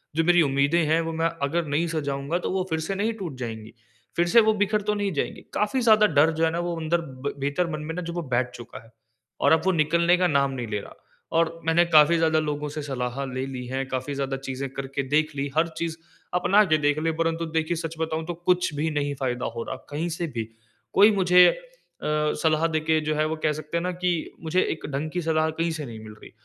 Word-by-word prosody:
जो 165 - +2
मेरी 175 0 +5
उम्मीदें 140 +4 +2
हैं, 160 +2 +2
वो 165 - -3
मैं 165 +1 +1 0.2
अगर 165 +4 0
नहीं 150 +4 0
सजाऊँगा, 145 0 -2
तो - - -3
वो 190 -1 0
फ़िर 160 0 0
से 195 +4 -3
नहीं 220 +3 0
टूट 160 -8 -5
जाएँगी? 110 -2 -6 0.4
फ़िर 175 0 +2
से 230 +5 +6
वो 220 0 +3
बिखर 210 0 +1
तो 210 +1 0
नहीं 205 -1 -1
जाएँगी? 140 - -3
काफ़ी 210 +5 0
ज़्यादा 215 -2 +6
डर 155 +1 +4
जो 160 +1 -1
है 160 - +1
ना 170 - -2
वो 175 0 -2
अंदर 165 +2 0
ब 135 -2 -6
भीतर 145 +6 0
मन 155 0 -4
में 160 - -4
ना 180 - -3
जब 170 0 -5
वो 175 - -1
बैठ 125 0 0
चुका 120 0 -10
है। 115 - -20 0.5
और - - +4
अब 160 - +5
वो 190 - +4
निकलने 170 +3 +3
का 180 0 +3
नाम 140 -3 +2
नहीं 125 -3 -4
ले 105 -1 -2
रहा। - - -13 0.4
और 165 0 +1
मैंने 170 +2 +4
काफ़ी 165 0 +6
ज़्यादा 160 -1 +3
लोगों 150 -1 -2
से 150 +1 -5
सलाह 130 -1 -3
ले 130 +1 -2
ली 125 -2 -6
है, 130 +1 -2
काफ़ी 130 +2 -4
ज़्यादा 135 -1 -2
चीज़ें 135 0 -5
करके 135 +1 -4
देख 155 +1 +2
ली, 140 +1 -2
हर 165 +1 +4
चीज़ 165 -1 -2 0.4
अपना 195 +4 +4
के 155 -3 +3
देख 145 0 +2
ली 165 - +2
परंतु 165 +1 -1
देखिए 160 +1 -1
सच 165 0 -5
बताऊ 160 0 -2
तो 175 - -3
कुछ 180 -3 +2
भी 155 +3 0
नहीं 145 -1 -1
फ़ायदा 125 -2 -2
हो 115 - -3
रहा, - - -5
कहीं 160 +4 -2
से 170 +1 -3
भी। 115 -1 -3 0.4
कोई 205 +3 +7
मुझे 180 -1 +6 0.6
अ, - - -4 0.4
सलाह 160 0 +2
देके 160 0 +1
जो 155 0 0
है 155 - +1
वो 160 - -2
कह 155 - +3
सकते 155 +2 -4
है - - 0
ना, 180 - -1
कि 180 -2 -2
मुझे 175 +3 +1
एक 160 - -3
ढंग 150 +3 -2
की 175 +1 -2
सलाह 160 -1 +1
कहीं 165 +1 -1
से 155 -2 -5
नहीं 115 -3 -8
मिल 110 -1 -10
रही। - - -13
160 Hz, 245 wpm, -25 LUFS, 140-170 Hz, 0.6 s, कोई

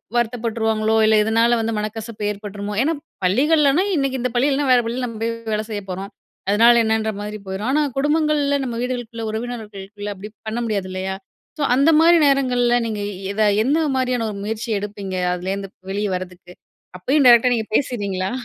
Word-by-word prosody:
வருத்தப்பட்டுருவாங்களோ, 225 -2 0
இல்ல 220 0 +4
இதனால 230 +2 +3
வந்து 225 0 -1
மனக்கசப்பு 215 0 -5
ஏற்பட்ருமோ, 205 0 -6
ஏன்னா 315 +4 +1 0.3
பள்ளிகள்னா 290 - +3
இன்னைக்கு 270 -2 -1
இந்த 250 - 0
பள்ளினா 280 +3 +2
வேற 250 - +6
பள்ளியில 250 +2 -2
நம்ம 225 -2 -8
போய் 230 - 0 0.2
வேல 215 0 0
செய்ய 205 -1 -4
போறோம். 190 +2 -5 0.4
அதனால 235 +3 +6
என்னன்ற 220 0 0
மாரி 210 +1 -5
போயிரும். 190 +4 -4
ஆனா 300 +2 +2 0.2
குடும்பங்கள்ல 295 -1 +2
நம்ம 245 -3 -4
வீடுகளுக்குள்ள 240 -2 -4
உறவினர்கள்குள்ள 210 -3 -6
அப்டி 200 +2 -9 0.2
பண்ண 225 +2 -2
முடியாது 200 -4 -2
இல்லையா? 190 +1 -3 0.4
ஸோ - - -5
அந்த 280 +5 +4
மாரி 340 +1 +6
நேரங்கள்ல 250 -3 +2
நீங்க 215 -2 -3 0.3
எத 215 - -2 0.2
எந்த 285 +7 +2 0.2
மாரியான 250 -3 0
ஒரு 200 - -7
முயற்சி 220 +3 -4
எடுப்பீங்க? 200 -2 -6 0.2
அதுல 180 +2 -3
இந்து 195 -1 -6 0.2
வெளிய 205 +1 -1
வர்றதுக்கு? 180 -1 -8 0.5
அப்பயும் 275 +9 +2
டேரக்டா 240 +1 +6
நீங்க 220 -2 -2
பேசிறீங்களா? 200 -8 -1
225 Hz, 165 wpm, -21 LUFS, 205-250 Hz, 0.5 s, வேற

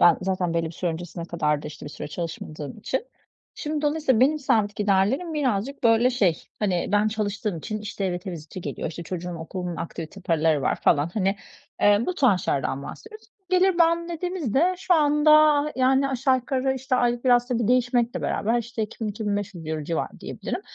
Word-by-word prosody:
Ben 170 -2 +6
zaten 185 -3 -1
belli 165 0 +1
bir - - -5
süre 175 0 -2
öncesine 170 +1 -6
kadar 150 -4 -1
da, - - -7
işte, 150 -1 -9
bir - - -7
süre - - -7
çalışmadığım 155 -2 -6
için. 265 - -2 0.5
Şimdi 305 -1 -3
dolayısıyla 295 -5 +2
benim 300 +4 +4
sabit 215 -6 +1
giderlerim 210 - +1
birazcık 260 -2 -1
böyle, 230 +2 +5
şey, 195 -10 +1
hani, 185 -5 0
ben 210 +1 +3
çalıştığım 210 -3 -2
için, 215 +6 -4
işte, 205 -1 -4
eve 180 -1 -1
temizlikçi 175 -1 -8
geliyor; - - -4
işte, 170 +2 -7
çocuğun 180 +1 -5
okulunun 175 +1 -5
aktivite 170 +3 -6
paraları 160 -4 +1
var - - +1
falan. 150 +1 +3
Hani, 195 -1 +1 0.4
eee, 205 0 +5
bu 365 - -1
tarz 240 - +3
şeylerden 135 0 -1
bahsediyoruz. 435 - -10 0.2
Gelir 370 -1 +3
bandı 335 0 +3
dediğimiz 335 - -3
de 350 +7 +3
şu 360 -1 +2
anda 300 0 +4 0.4
yani 265 +1 +3
aşağı 265 0 +2
yukarı, 265 +1 -1
işte, 260 0 -1
aylık 240 0 +1
biraz 245 0 +4
tabii 235 -3 0
değişmekle 245 -1 +2
beraber, 230 +3 0
işte, 235 -1 -4
€2.000-€2.500 205 -8 -3
civarı 165 +1 -3
diyebilirim. - - -5
215 Hz, 175 wpm, -25 LUFS, 175-265 Hz, 0.5 s, Ben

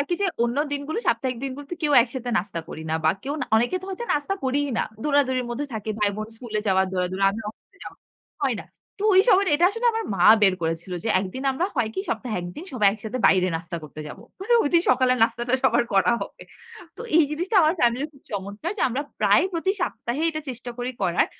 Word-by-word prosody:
হয় - - +1
কি 350 - +1
যে, - - +3 0.2
অন্য 240 +2 -2 0.2
দিনগুলো 285 +7 -3
সাপ্তাহিক 255 -2 0
দিনগুলোতে 280 +4 -6
কেউ 295 -1 +1
একসাথে 245 0 -5
নাস্তা 175 -2 -4
করি 160 - -7
না - - +1
বা 160 - +5
কেউ 280 +3 -3
না - - 0
অনেকে 240 +11 +1
তো - - -7
হয়তো 385 +5 -5
নাস্তা 295 +7 -1
করিই 280 +2 0
না। - - +2 0.2
দৌড়াদৌড়ির 265 -4 +1
মধ্যে 270 +5 -3
থাকে 215 0 -4
ভাই 210 -1 +2
বোন 215 0 -4
স্কুলে 220 -3 -4
যাওয়া 190 -1 +3
দৌড়াদৌড়ি 185 +1 -1
আমি 210 +3 -5
অফিসে 395 - -29
যাব। - - -9 0.5
হয় 260 -4 +1
না। - - -12 0.3
তো - - -2
ওই 375 - +8
সবার 395 -1 +5
এটা 325 +4 +3
আসলে 455 +3 -2
আমার 450 0 -2
মা 175 - +2 0.2
বের 195 -2 +5
করেছিল 165 +2 -3
যে, - - -1
১ 195 - -3
দিন 260 - -5
আমরা 330 +7 0
হয় 240 -3 +1
কি - - -1
সপ্তাহে 245 -4 -3
১ 175 - -6
দিন 325 - -7
সবাই 215 -6 +4
একসাথে 220 +3 -5
বাইরে 185 -1 +4
নাস্তা 170 +1 -6
করতে 155 0 -9
যাব। - - -10 0.2
মানে 415 +5 -1
ঐদিন 335 +3 +3
সকালের 255 0 +3
নাস্তাটা 240 +2 +1
সবার 260 - +4
করা 195 +4 +4
হবে। - - -9 0.5
তো - - -12 0.2
এই 330 - +6
জিনিসটা 350 +8 -3
আমার 310 +2 +3
ফ্যামিলির 245 +5 +2
খুব 275 - -21
চমৎকার 205 - -4
যে, - - 0
আমরা 255 +4 -2 0.2
প্রায় 205 - +5
প্রতি 355 +3 0
সাপ্তাহে 295 -5 -2
এটা 310 -1 -4
চেষ্টা 245 0 -8
করি 245 +1 -2
করার - - +2
250 Hz, 225 wpm, -24 LUFS, 210-295 Hz, 0.5 s, ওই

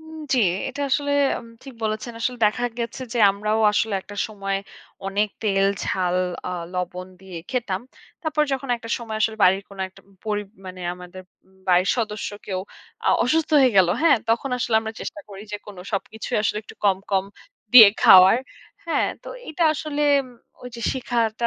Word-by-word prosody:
উম 320 0 -12 0.2
জ্বী। 255 - +3 0.3
এটা 275 +2 -7
আসলে 285 +1 +1 0.3
আম 230 - -11 0.2
ঠিক 270 -3 -10
বলেছেন। 215 +2 -2
আসলে 250 +1 -1
দেখা 245 +4 -1
গেছে 235 +2 -4
যে 240 - -2
আমরাও 215 +2 -1
আসলে 215 -1 0
একটা 205 +2 -12
সময় 195 -2 -3 0.5
অনেক 205 +2 0
তেল, 195 -2 +2 0.2
ঝাল, 180 -1 0 0.3
আ - - -2 0.2
লবণ 180 0 -4
দিয়ে 190 -3 -10
খেতাম। 220 -7 -2 0.4
তারপর 310 -1 +1
যখন 270 0 -3
একটা 230 -1 -11
সময় 225 -2 -5
আসলে 220 0 +1
বাড়ির 190 +2 +5
কোনো 195 -1 -9
একটা 190 - -19 0.2
পড়ি 210 -1 -1 0.3
মানে 185 0 -8
আমাদের 180 +1 -11 0.5
বাড়ির 180 +1 +4
সদস্য 215 -3 -2 0.2
কেউ 190 -2 -2 0.5
আ - - +5 0.2
অসুস্থ 315 +5 +1
হয়ে 260 -2 +5
গেল। 185 -2 +6
হ্যাঁ? 330 - +6
তখন 235 +4 +1
আসলে 235 -2 -1
আমরা 220 0 -5
চেষ্টা 305 - -6
করি 200 -1 -10
যে, 205 - -1
কোনো 200 -3 -10
সবকিছুই 215 +2 -3
আসলে 210 0 0
একটু - - -13
কম, 195 -2 +4
কম 190 -1 +2 0.5
দিয়ে 225 -4 +12
খাওয়ার। 190 +4 +8 0.5
হ্যাঁ? 335 - +1 0.2
তো, - - -9 0.2
এইটা 315 +2 -3
আসলে, 295 -1 -4 0.3
ম 255 - -14 0.3
ওই 250 - -7
যে, 235 - -8
শিখাটা 235 -3 -1
215 Hz, 175 wpm, -23 LUFS, 195-245 Hz, 0.5 s, দিয়ে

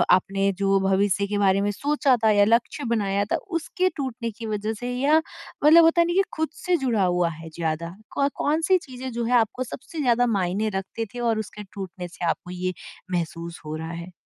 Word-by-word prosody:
आपने 195 +1 0
जो 195 0 +3
भविष्य 195 +1 +2
के 205 0 -1
बारे 195 -1 +3
में 205 - +1
सोचा 280 +3 +2
था 220 - +5
या 205 -1 +5
लक्ष्य 230 +6 +1
बनाया 200 -3 +1
था - - +4
उसके 365 +2 0
टूटने 245 -4 -3
की 225 +1 -9
वजह 215 0 -2
से 245 0 -3
या, 310 +3 +4 0.4
मतलब 325 +3 +8
होता 335 +1 +5
नहीं 345 +1 -1
कि 390 - +5
ख़ुद 315 -1 0 0.2
से 360 -1 +3
जुड़ा 235 -8 +1
हुआ 180 -1 +2
है 165 0 -9
ज़्यादा, 165 +2 -3 0.2
कौन 280 0 +1
कौन 310 +3 +1
सी 370 +3 +4
चीज़ें 260 -5 -7
जो 235 0 -2
हैं 245 - +2
आपको 230 +3 0
सबसे 310 +6 -8
ज़्यादा 245 -1 +3
मायने 200 0 0
रखते 195 +4 -3
थे - - -4
और 230 -2 +1
उसके 210 0 -7
टूटने 190 -2 -6
से 175 0 -6
आपको 180 +1 -2
ये 185 0 -2 0.4
महसूस 170 0 -3
हो 155 +1 -4
रहा 160 +1 -5
है। 170 +2 -7
210 Hz, 210 wpm, -24 LUFS, 185-255 Hz, 0.4 s, मतलब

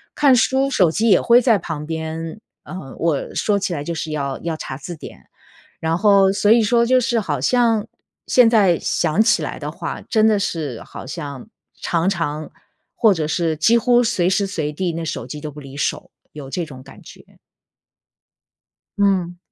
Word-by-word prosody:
看 280 -3 +5
书 265 +3 +2
手 185 -11 +3
机 220 +6 +1
也 185 - +5
会 240 +1 +5
在 230 -3 +4
旁 160 -4 -6
边 160 +3 -5 0.2
呃， 155 -8 -9
我 160 -4 -1
说 205 -1 +1
起 195 -2 -2
来 145 - -3
就 170 +2 -4
是 160 -1 -4
要 140 -3 -3
要 165 -2 -3
查 135 - -6
字 175 +5 -8
典。 - - -12 0.6
然 160 +1 0
后， 195 -1 +4
所 205 +1 +2
以 230 0 +6
说 235 +2 +3
就 255 +1 +4
是 240 -1 0
好 145 -7 -2
像 230 - +2 0.4
现 250 -2 +5
在 195 -7 +4
想 165 +5 +1
起 - - +3
来 - - -4
的 - - -5
话， - - -6
真 220 -1 +2
的 215 -2 +3
是， 150 - -3
好 - - -10
像 145 +1 -7 0.3
常 170 +2 0
常 155 -4 -3 0.4
或 220 -4 +4
者 155 -4 -2
是 160 0 0
几 225 +10 +3
乎 245 +1 +3
随 185 -6 +1
时 200 +2 +1
随 160 -6 -3
地 175 +3 -2
那 165 - -4
手 135 - -4
机 150 +4 -7
都 155 - -5
不 150 +1 -11
离 135 0 -11
手， - - -3 0.2
有 140 -3 -9
这 170 +3 -3
种 130 -3 -12
感 135 - -15
觉。 - - -16 1.6
嗯。 185 -4 +1
175 Hz, 205 characters per minute, -20 LUFS, 155-215 Hz, 1.6 s, 以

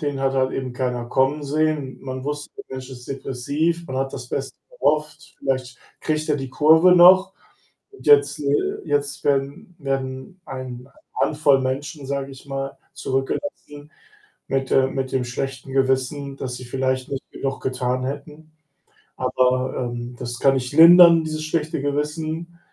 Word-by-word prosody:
den 145 -3 -2
hat 135 0 +1
halt 130 0 +1
eben 130 -2 -4
keiner 125 -2 -2
kommen 135 +4 +1
sehen. 150 -2 -1
Man 130 -1 -6
wusste, 145 +1 -4
der 200 - -8
Mensch 130 0 -8
ist 125 -1 -11
depressiv, 145 +6 -2
man 130 - -4
hat 135 0 -2
das - - -7
Beste - - -4
gehofft, 150 - -1
vielleicht 130 -2 -2 0.2
kriegt 155 0 -1
er 150 - +2
die 135 -2 -6
Kurve 160 +6 +6
noch. 185 +2 +7 0.6
Und 405 - -16
jetzt, 435 -1 +5
äh 140 0 0
jetzt 145 -1 -2
werden 140 +4 -1
werden 135 +4 -4
ein 130 -1 -7 0.3
Handvoll 145 -3 +3
Menschen, 140 +2 -4
sage 140 0 -3
ich 135 +1 -14
mal, 135 0 -5 0.2
zurückgelassen 145 - -4 0.6
mit 135 0 -1
der 130 - +4
mit 135 -1 -3
dem 130 -1 0
schlechten 130 +1 -5
Gewissen, 135 +1 0
das 125 -2 -5
sie 125 - -9
vielleicht 130 +1 -1
nicht 135 -1 -5
genug 135 0 -4
getan 130 0 -1
hätten. 150 +3 -7 0.6
Aber, 130 0 +1
ähm, 120 0 -4
das 120 0 -5
kann 135 -1 +4
ich 125 -1 -2
lindern, 170 +1 +8
dieses 155 0 -4
schlechte 155 -1 -2
Gewissen. 155 +4 -3
135 Hz, 155 wpm, -22 LUFS, 130-155 Hz, 0.6 s, lindern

